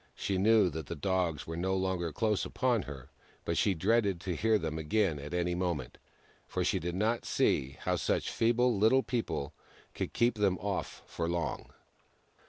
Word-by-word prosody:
She 95 Hz, -2 st, -1 dB
knew 105 Hz, -2 st, +5 dB
that 80 Hz, -2 st, -6 dB
the 85 Hz, -, -4 dB
Dogs 85 Hz, -1 st, -1 dB
were 80 Hz, -, -5 dB
no 95 Hz, +3 st, 0 dB
longer 95 Hz, -3 st, -1 dB
close 105 Hz, +6 st, 0 dB
upon 125 Hz, -4 st, +1 dB
her, 70 Hz, -2 st, -9 dB, 0.4 s
but 85 Hz, -, 0 dB
she 100 Hz, +1 st, +2 dB
dreaded 100 Hz, +1 st, +2 dB
to 90 Hz, -2 st, -3 dB
hear 110 Hz, +6 st, +3 dB
them 80 Hz, -4 st, -3 dB
again 80 Hz, 0 st, +1 dB
at 75 Hz, +1 st, -7 dB
any 90 Hz, 0 st, 0 dB
moment, 90 Hz, -3 st, -3 dB, 0.5 s
for -, -, -1 dB
she -, -, +1 dB
did 85 Hz, +1 st, -3 dB
not 110 Hz, +4 st, 0 dB
see 70 Hz, +1 st, +1 dB
how -, -, 0 dB
such -, -, 0 dB
feeble 120 Hz, +1 st, +2 dB
Little 110 Hz, +6 st, +4 dB
People 85 Hz, -, -2 dB, 0.4 s
could -, -, -3 dB
keep 120 Hz, -2 st, +2 dB
them 95 Hz, -3 st, +2 dB
off 100 Hz, 0 st, -4 dB
for 85 Hz, -1 st, -3 dB
long. 85 Hz, -1 st, -3 dB
95 Hz, 180 wpm, -31 LUFS, 85-110 Hz, 0.5 s, knew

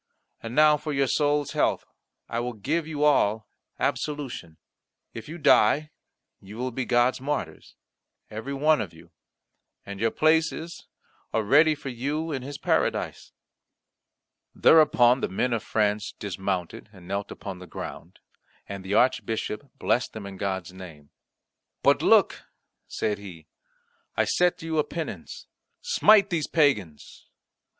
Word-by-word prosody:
And 115 Hz, +1 st, -7 dB
now 150 Hz, 0 st, +6 dB
for 150 Hz, -, -5 dB
your 140 Hz, 0 st, +2 dB
soul's 145 Hz, +1 st, +1 dB
health -, -, 0 dB, 0.4 s
I 115 Hz, -, -3 dB
will 120 Hz, +1 st, -3 dB
give 155 Hz, +10 st, -2 dB
you 150 Hz, -2 st, -3 dB
all 110 Hz, -7 st, +2 dB, 0.3 s
absolution. 135 Hz, -, -3 dB, 0.6 s
If 115 Hz, +4 st, -9 dB
you 165 Hz, -, -7 dB
die, 150 Hz, 0 st, +4 dB, 0.5 s
you 100 Hz, +3 st, -12 dB
will 125 Hz, +1 st, -3 dB
be 125 Hz, +1 st, -3 dB
God's 120 Hz, +1 st, +2 dB
martyrs, 130 Hz, -, -4 dB, 0.5 s
every 110 Hz, +5 st, -7 dB
one 150 Hz, 0 st, +2 dB
of 90 Hz, -6 st, -7 dB
you, 85 Hz, +1 st, -17 dB, 0.7 s
and 100 Hz, 0 st, -8 dB
your 115 Hz, +1 st, +2 dB
places 160 Hz, +4 st, 0 dB, 0.5 s
are 110 Hz, -, +1 dB
ready 150 Hz, +8 st, +5 dB
for 140 Hz, -2 st, -7 dB
you 145 Hz, +6 st, -3 dB
in 135 Hz, -3 st, -3 dB
His 140 Hz, +2 st, -7 dB
Paradise." -, -, -1 dB, 1.2 s
Thereupon 130 Hz, -6 st, +5 dB
the -, -, -1 dB
men 120 Hz, +6 st, -1 dB
of 115 Hz, -, -1 dB
France 105 Hz, -1 st, -1 dB
dismounted, 95 Hz, -1 st, -4 dB
and 90 Hz, -4 st, -15 dB
knelt 100 Hz, 0 st, -3 dB
upon 95 Hz, -2 st, -8 dB
the 90 Hz, -, -11 dB
ground, -, -, -8 dB, 0.5 s
and 100 Hz, -1 st, -7 dB
the 95 Hz, +2 st, -2 dB
Archbishop 120 Hz, +1 st, 0 dB
blessed 120 Hz, -, 0 dB
them 110 Hz, -2 st, -7 dB
in 100 Hz, -1 st, -8 dB
God's 95 Hz, -2 st, -3 dB
name. 80 Hz, -6 st, -12 dB, 0.7 s
"But -, -, +4 dB
look," -, -, +3 dB, 0.4 s
said 105 Hz, -1 st, -2 dB
he, 90 Hz, -6 st, -11 dB, 0.7 s
"I -, -, +3 dB
set 180 Hz, -1 st, +1 dB
you 160 Hz, -1 st, -1 dB
a -, -, +3 dB
penance 165 Hz, +1 st, -7 dB, 0.3 s
smite 215 Hz, -, +4 dB
these 160 Hz, -4 st, -1 dB
pagans." 110 Hz, -, 0 dB
120 Hz, 140 wpm, -26 LUFS, 100-150 Hz, 1.2 s, now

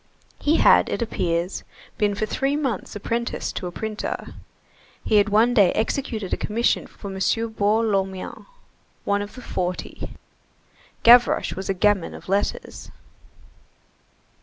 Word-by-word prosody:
He 300 Hz, +2 st, +2 dB
had, -, -, +5 dB
it -, -, -1 dB
appears, 175 Hz, -4 st, -2 dB, 0.4 s
been 205 Hz, -1 st, +2 dB
for 215 Hz, -, -1 dB
three 270 Hz, +6 st, -1 dB
months 265 Hz, -11 st, -3 dB
apprenticed 235 Hz, +3 st, -3 dB
to 180 Hz, -, -3 dB
a -, -, -5 dB
printer. 215 Hz, +4 st, -5 dB, 0.7 s
He 215 Hz, -, +3 dB
had 205 Hz, +1 st, +4 dB
one 225 Hz, +4 st, +4 dB
day 200 Hz, -7 st, +5 dB
executed 220 Hz, -4 st, -2 dB
a -, -, 0 dB
commission 230 Hz, +3 st, 0 dB
for 200 Hz, -, -10 dB
M. -, -, -5 dB, 0.3 s
Baour 220 Hz, +1 st, +1 dB
Lormian, 195 Hz, -3 st, -2 dB, 0.6 s
one 200 Hz, 0 st, +1 dB
of 205 Hz, -, -7 dB
the 250 Hz, -, -10 dB
Forty. 180 Hz, 0 st, -4 dB, 0.9 s
Gavroche 240 Hz, +1 st, +6 dB
was 190 Hz, +1 st, -6 dB
a 195 Hz, -, +1 dB
gamin 205 Hz, -2 st, +1 dB
of -, -, -12 dB
letters. 200 Hz, +1 st, -2 dB
210 Hz, 135 wpm, -23 LUFS, 195-235 Hz, 0.9 s, Gavroche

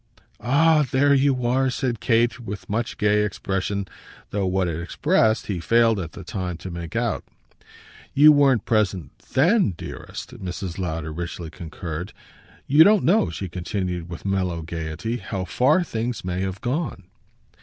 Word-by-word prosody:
"Ah 150 Hz, +6 st, +4 dB
there 140 Hz, +2 st, +4 dB
you 135 Hz, -2 st, +2 dB
are!" 130 Hz, +2 st, +2 dB
said 125 Hz, -2 st, -2 dB
Kate 120 Hz, +1 st, +2 dB
with 105 Hz, -4 st, -7 dB
much 115 Hz, +3 st, -2 dB
gay 105 Hz, 0 st, +3 dB
expression, 100 Hz, -1 st, -2 dB, 0.4 s
though 100 Hz, -2 st, 0 dB
what 95 Hz, 0 st, +1 dB
it 85 Hz, -1 st, -3 dB
expressed 110 Hz, +5 st, +1 dB
he 95 Hz, -4 st, -3 dB
failed 115 Hz, +4 st, +3 dB
at 85 Hz, -3 st, -5 dB
the 95 Hz, -, -9 dB
time 90 Hz, -1 st, -4 dB
to 90 Hz, +2 st, -8 dB
make 85 Hz, -1 st, -7 dB
out. -, -, -1 dB, 0.9 s
"You 150 Hz, +2 st, +8 dB
weren't 140 Hz, -6 st, +4 dB
present 95 Hz, -, 0 dB
THEN, 160 Hz, -, +2 dB
dearest," -, -, -8 dB
Mrs. 90 Hz, 0 st, -5 dB
Lowder 80 Hz, -3 st, -3 dB
richly 85 Hz, 0 st, -5 dB
concurred. 85 Hz, +2 st, -6 dB, 0.5 s
"You 150 Hz, +4 st, +7 dB
don't 205 Hz, +1 st, +5 dB
know," 205 Hz, +6 st, +3 dB
she 95 Hz, -, -5 dB
continued 90 Hz, -1 st, -4 dB
with 85 Hz, -, -8 dB
mellow 90 Hz, -4 st, -1 dB
gaiety, 85 Hz, +8 st, -4 dB
"how 95 Hz, -5 st, -4 dB
far 145 Hz, -, +3 dB
things 115 Hz, -, -3 dB
may 90 Hz, 0 st, -2 dB
have 95 Hz, 0 st, -3 dB
gone." 130 Hz, -4 st, -2 dB
100 Hz, 155 wpm, -23 LUFS, 90-125 Hz, 0.9 s, You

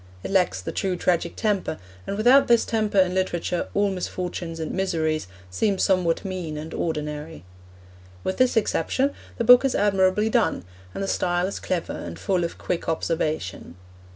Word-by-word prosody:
It -, -, -5 dB
lacks 180 Hz, -, +2 dB
the 90 Hz, -, -5 dB
true 190 Hz, -2 st, -1 dB
tragic 175 Hz, -1 st, 0 dB
temper, 205 Hz, -7 st, -1 dB, 0.3 s
and 200 Hz, -, -3 dB
without 250 Hz, +6 st, +6 dB
this 235 Hz, -1 st, +4 dB
temper 215 Hz, -3 st, -1 dB
in 185 Hz, -1 st, +4 dB
literature 180 Hz, -2 st, -1 dB
all 200 Hz, 0 st, +2 dB
misfortunes 180 Hz, -2 st, -4 dB
and 160 Hz, -, -3 dB
miseries 160 Hz, -, -1 dB, 0.2 s
seem 195 Hz, -, +1 dB
somewhat 185 Hz, -2 st, +1 dB
mean 180 Hz, -5 st, -4 dB
and 155 Hz, +2 st, -7 dB
ordinary. 150 Hz, -, -4 dB, 0.8 s
With 190 Hz, -, -2 dB
this 255 Hz, -2 st, +3 dB
exception 260 Hz, -, +1 dB, 0.3 s
the -, -, 0 dB
book 245 Hz, +2 st, +8 dB
is 270 Hz, -, +1 dB
admirably 195 Hz, +1 st, +3 dB
done, 220 Hz, -, +1 dB, 0.3 s
and -, -, -3 dB
the -, -, -2 dB
style 175 Hz, -1 st, 0 dB
is 195 Hz, -, -4 dB
clever 180 Hz, -3 st, -2 dB
and 85 Hz, -1 st, -7 dB
full 180 Hz, -, 0 dB
of 170 Hz, -, -4 dB
quick 175 Hz, -2 st, -3 dB
observation. 155 Hz, -, -2 dB
185 Hz, 165 wpm, -24 LUFS, 165-200 Hz, 0.8 s, book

